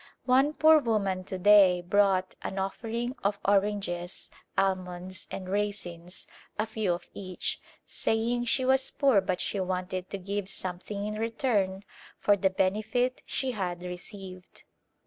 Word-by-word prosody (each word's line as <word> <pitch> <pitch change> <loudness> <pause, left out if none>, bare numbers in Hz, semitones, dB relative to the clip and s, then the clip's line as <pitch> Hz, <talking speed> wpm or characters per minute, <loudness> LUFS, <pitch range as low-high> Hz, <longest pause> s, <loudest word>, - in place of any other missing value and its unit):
One 270 +4 +4
poor 315 0 +7
woman 200 -7 0
to 190 - -4
day 185 -2 +6
brought 190 0 +2
an 190 - -5
offering 230 +6 -2
of 200 +1 +1
oranges, 195 -3 0 0.3
almonds 185 -1 -1
and 185 - -6
raisins 185 -3 -3 0.2
— - - -32
a 215 - +1
few 220 -4 0
of 175 - -6
each 185 -2 -4
— - - -37
saying 235 +2 0
she 255 +2 +2
was 265 +1 +3
poor 270 -8 +3
but 185 -1 -1
she 200 - -1
wanted 185 0 -2
to 200 - -4
give 200 +1 -3
something 190 +3 -4
in 215 0 -3
return 220 -4 0 0.3
for 205 - +4
the 195 -1 +2
benefit 215 +7 0
she 265 -1 -1
had 180 -5 -3
received. 185 +1 -9
195 Hz, 145 wpm, -29 LUFS, 185-220 Hz, 0.3 s, poor